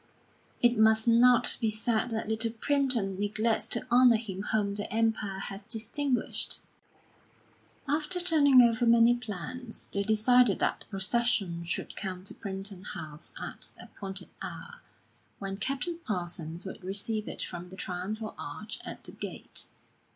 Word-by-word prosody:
It 240 -2 +4
must 220 +1 +5
not 240 +1 +5
be 225 - +2
said 220 +2 +1
that 225 -1 -2
Little 220 +1 +1
Primpton 235 -5 0
neglects 215 +2 +1
to - - +3
honour 245 -1 +7
him 195 -4 -5
whom 205 -2 +1
the 205 0 -4
Empire 220 -3 0
has 195 +1 -5
distinguished." 235 +5 0 1.3
After 305 +5 +1
turning 290 -7 +6
over 235 0 +3
many 235 +1 +6
plans, 240 +1 -6
they 200 - 0
decided 220 +1 +4
that - - 0
the - - -12
procession 195 -4 +1
should 175 - -4
come 185 -3 -4
to 190 - -3
Primpton 195 -1 -5
House 155 -5 -7
at - - -2
the - - -9
appointed 195 -1 -6
hour, - - -8 0.6
when 195 -1 -5
Captain 275 - -2
Parsons 175 -4 -4
would 190 - -8
receive 205 +3 -1
it - - -3
from 175 0 -7
the 190 - -10
triumphal 195 +4 -4
arch 215 +9 -6
at - - -7
the - - -9
gate.... - - -6
220 Hz, 145 wpm, -29 LUFS, 195-240 Hz, 1.3 s, honour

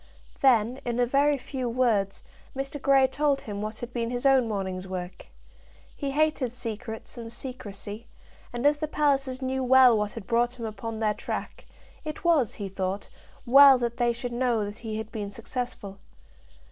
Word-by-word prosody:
Then, 245 -1 +3
in 240 0 -2
a 245 - +4
very 280 +3 +3
few 260 -2 -4
words, 225 -5 +1 0.3
Mr. 275 +1 -4
Grey 275 -1 +5
told 280 +1 +1
him 205 -2 -6
what 215 +1 -4
had 240 0 -6
been 230 -1 -2
his 245 +2 -3
own 265 -3 +5
morning's 190 -3 -3
work. 185 -1 -6 0.7
He 280 - -3
hated 295 -3 +1
secrets 225 -1 -6
and 230 -1 -7
secrecy, 225 -3 -7 0.4
and 240 +2 -4
as 295 0 +4
the 310 - -1
Pallisers 275 -3 0
knew 260 0 -1
well 255 -1 +7
what 210 -1 -1
had 225 -4 -8
brought 240 +2 +1
him 230 - -4
upon 220 +1 -5
their 215 -1 +1
track, - - -6 0.4
it 310 +6 -6
was, 315 - +3
he 200 - -5
thought, 190 +1 -4 0.4
well 275 +2 +8
that 235 -1 -2
they 240 -1 +2
should 240 +1 -5
know 240 -3 +1
that 205 +2 -8
he 220 -2 -5
had 220 0 -6
been 205 -2 -4
successful. 225 -2 -6
240 Hz, 175 wpm, -27 LUFS, 215-265 Hz, 0.7 s, well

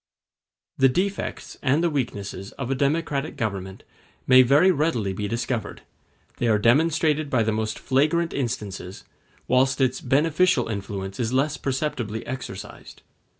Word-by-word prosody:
The 135 0 +6
defects 190 +8 -3
and 145 +4 +2
the 170 - +3
weaknesses 100 -8 -4
of 135 -1 -5
a - - +3
democratic 145 +1 -1
government 95 -4 -4 0.4
may 130 0 +7
very 145 +9 +5
readily 140 - 0
be 105 +2 -3
discovered; 120 +1 -3 0.5
they 120 - 0
are 110 -2 +4
demonstrated 150 +5 +2
by 120 -4 +2
the 110 - 0
most 110 0 -2
flagrant 155 +5 +1
instances, 105 -7 -4 0.4
whilst 130 +2 +2
its 130 -1 +1
beneficial 150 +1 +2
influence 100 -2 -5
is 120 0 -1
less 135 +3 +1
perceptibly 130 -6 -3
exercised. 120 -7 -8
130 Hz, 135 wpm, -24 LUFS, 110-150 Hz, 0.5 s, may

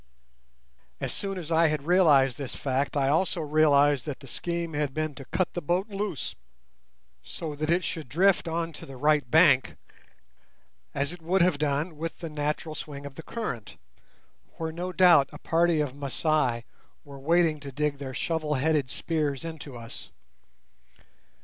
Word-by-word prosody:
As - - -2
soon 195 -1 -3
as 170 -2 -6
I 165 0 +5
had 150 -2 -2
realised 150 -8 +4
this 135 -3 -4
fact, 135 +1 -1
I 135 -1 +2
also 165 +5 +2
realised 145 -3 +3
that 145 - -4
the 140 - -13
scheme 170 +4 -3
had 145 -2 -1
been 155 -1 -1
to 135 -1 -10
cut 185 +5 -1
the 175 - -3
boat 180 +7 0
loose 205 +1 -3 0.9
so 160 -4 -6
that 155 +2 -3
it 175 +2 +2
should 160 -6 -4
drift 180 +6 +3
on 165 0 -2
to - - -10
the 135 -1 -9
right 150 -1 +2
bank 155 -4 +5 1.2
(as 140 +3 -1
it 175 - -11
would 175 +3 +2
have 175 -5 +2
done 150 +2 -1
with 165 +2 -4
the 165 -3 -7
natural 150 +1 -2
swing 145 -2 -7
of 140 - -7
the 150 - -8
current), 155 - -5 0.8
where 160 -1 -3
no 175 +3 -4
doubt 175 -7 +6
a - - -7
party 165 -1 +2
of 145 -4 -2
Masai 140 -3 0 0.4
were 140 -1 -10
waiting 165 +1 +2
to 140 -1 -8
dig 145 +1 -1
their 130 -2 -6
shovel 155 -1 -1
headed 145 -1 +1
spears 150 -2 -2
into 155 -5 -7
us. 115 0 -9
155 Hz, 170 wpm, -27 LUFS, 140-170 Hz, 1.2 s, doubt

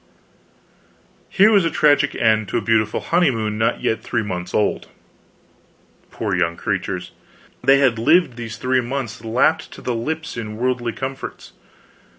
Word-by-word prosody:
Here 205 +3 +5
was 200 -4 +5
a 165 - +1
tragic 145 -2 +3
end 110 -2 +2
to - - -1
a - - 0
beautiful 110 -1 +1
honeymoon 115 -11 0
not 110 - 0
yet 110 0 0
three 115 0 -2
months 90 -3 -5
old. 105 - 0 1.2
Poor 105 -4 -3
young 85 -1 0
creatures! - - -3 0.5
They 135 +1 +6
had 130 -5 +2
lived 160 +2 +3
these 115 -1 -7
three 130 +1 +1
months 120 -2 -5
lapped 115 +2 +1
to - - -11
the 125 - -1
lips 155 +6 -4
in 110 -2 -5
worldly 120 -1 -1
comforts. 135 +2 -7
120 Hz, 150 wpm, -20 LUFS, 110-135 Hz, 1.2 s, They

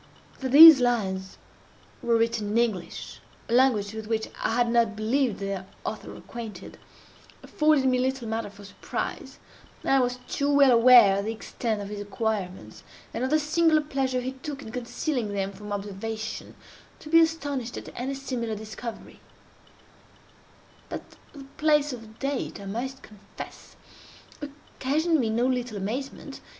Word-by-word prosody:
That 260 -1 -3
these 315 0 +11
lines 190 -6 -1 0.6
were 235 -1 +2
written 230 -2 0
in 215 - 0
English—a 230 +1 -4
language 235 -5 +3
with 220 -1 -7
which 220 -1 -1
I 225 - 0
had 240 -1 +2
not 230 -2 +2
believed 230 +2 0
their 195 -1 -4 0.2
author - - -5
acquainted—afforded 265 +5 -3
me 255 -1 +3
little 260 -2 -1
matter 220 -1 -3
for 205 0 -14
surprise. 195 - -5 0.5
I 270 - +3
was 250 0 0
too 285 0 0
well 280 -2 +6
aware 235 -4 +7
of 200 - -3
the 220 - -1
extent 225 -1 -3
of 200 - -7
his 205 -1 -5
acquirements, 205 -2 -4 0.3
and 240 - -3
of 260 - 0
the 310 - +4
singular 310 +1 +3
pleasure 265 -3 -1
he 255 +1 -3
took 280 +2 -7
in 220 - -9
concealing 245 -1 -3
them 195 -1 -2
from 205 +1 -10
observation, 210 +2 -5 0.4
to - - -13
be 330 +1 +7
astonished 285 -7 0
at - - -8
any 265 +3 -3
similar 245 -5 -3
discovery; 220 +2 -8 1.7
but - - -5 0.3
the 280 -2 -10
place 300 -2 +2
of 225 -2 -11
date, 275 -6 -3
I 200 - -9
must 255 +7 -5
confess, 210 -1 -12 0.7
occasioned 300 +2 -1
me 230 -4 0
no 230 +3 +1
little 250 -4 -1
amazement. 235 +8 -5
240 Hz, 145 wpm, -26 LUFS, 215-270 Hz, 1.7 s, these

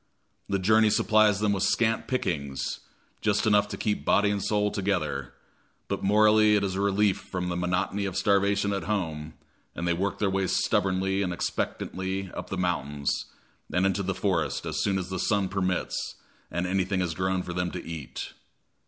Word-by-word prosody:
The 100 - +1
journey 110 +3 +4
supplies 105 -1 +4
them 105 -1 +2
with 95 - -1
scant 115 +2 +1
pickings, 70 - -2 0.4
just 105 +1 +1
enough 105 -1 +4
to - - -6
keep 105 -1 -1
body 105 0 +3
and 100 -1 -1
soul 105 -1 +1
together, 75 - -2 0.5
but - - -2
morally 105 +1 +5
it 100 - +2
is 95 -2 -1
a 95 - -1
relief 100 0 +2
from 90 -1 -4
the 85 - -2
monotony 90 +3 -1
of 95 -1 -3
starvation 100 +1 +2
at 100 - -3
home, 80 -7 -3 0.4
and 85 - -3
they 85 - +3
work 95 +3 -1
their 105 - +1
way 95 0 0
stubbornly 95 +1 +1
and 90 -2 -1
expectantly 95 +2 -3
up - - -7
the - - -3
mountains 75 -5 -1 0.5
and 90 +1 +2
into 95 +1 +1
the 95 -1 -2
forest 95 -6 0
as - - -2
soon 100 -1 +1
as 90 -1 -4
the 95 - -2
sun 100 +1 +1
permits 95 -2 -2 0.3
and 85 +3 -2
anything 95 +1 0
has 90 -3 -1
grown 95 +1 -1
for 90 - -5
them 90 0 -1
to 90 - -7
eat. 75 -7 -6
95 Hz, 180 wpm, -27 LUFS, 90-100 Hz, 0.5 s, morally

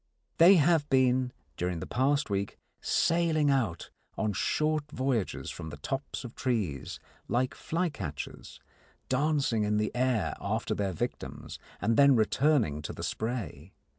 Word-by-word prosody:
They 175 +4 +9
have 160 -2 +3
been, 130 -1 +3 0.3
during 90 -1 -2
the - - -5
past 135 +1 +1
week, 100 0 -2 0.2
sailing 160 -3 +2
out 110 - -1 0.3
on 105 -2 0
short 150 +7 0
voyages 130 -7 -1
from 80 - -7
the 75 - -8
tops 135 - -4
of 125 -1 -8
trees, 105 - -2 0.3
like 125 +4 0
flycatchers, 145 - -4 0.5
dancing 135 -4 +1
in 105 0 +1
the 105 0 0
air 125 -4 +1
after 110 +3 -1
their 100 -2 -1
victims 80 - -5 0.2
and 110 +4 +1
then 140 -1 +7
returning 115 - +2
to 75 - -6
the - - -7
spray. 100 - -4
125 Hz, 135 wpm, -29 LUFS, 100-145 Hz, 0.5 s, They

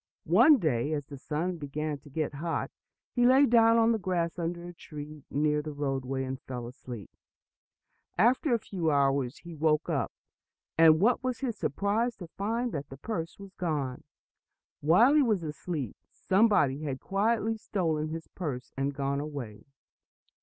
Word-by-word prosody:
One 240 - +7
day, 150 - 0
as 145 -2 -2
the 140 0 -9
sun 165 +6 -2
began 150 0 -4
to 145 - -16
get 155 +1 -2
hot, 165 +4 -3 0.4
he 245 - +1
lay 265 +3 +7
down 230 -2 +5
on 230 0 +4
the 225 - +1
grass 175 -3 -1
under 170 +1 -3
a 175 - -8
tree 150 -3 -10
near 150 +1 +1
the 150 0 -6
roadway, 135 -2 -2
and 130 0 -5
fell 125 -2 -6
asleep. 120 -3 -9 1.1
After 245 - +3
a 235 - +4
few 180 -7 -2
hours 140 -3 +2
he 170 -1 -9
woke 155 +1 +1
up, 140 -6 0 0.6
and 160 -1 +7
what 240 +7 +3
was 255 -1 -2
his 245 -5 -1
surprise 220 +4 0
to 180 -4 -9
find 230 +7 -2
that 145 -4 -5
the 135 - -9
purse 165 -1 -4
was 195 -1 -11
gone! 145 -8 -2 0.8
While 200 - +5
he 305 - +6
was 215 -9 +1
asleep, 150 - -4
somebody 190 -9 +2
had 140 -4 -3
quietly 220 - 0
stolen 165 -8 -1
his 160 +1 -6
purse 140 -9 -5
and 135 +1 -1
gone 140 0 -1
away. 140 -8 -6
160 Hz, 165 wpm, -29 LUFS, 140-205 Hz, 1.1 s, One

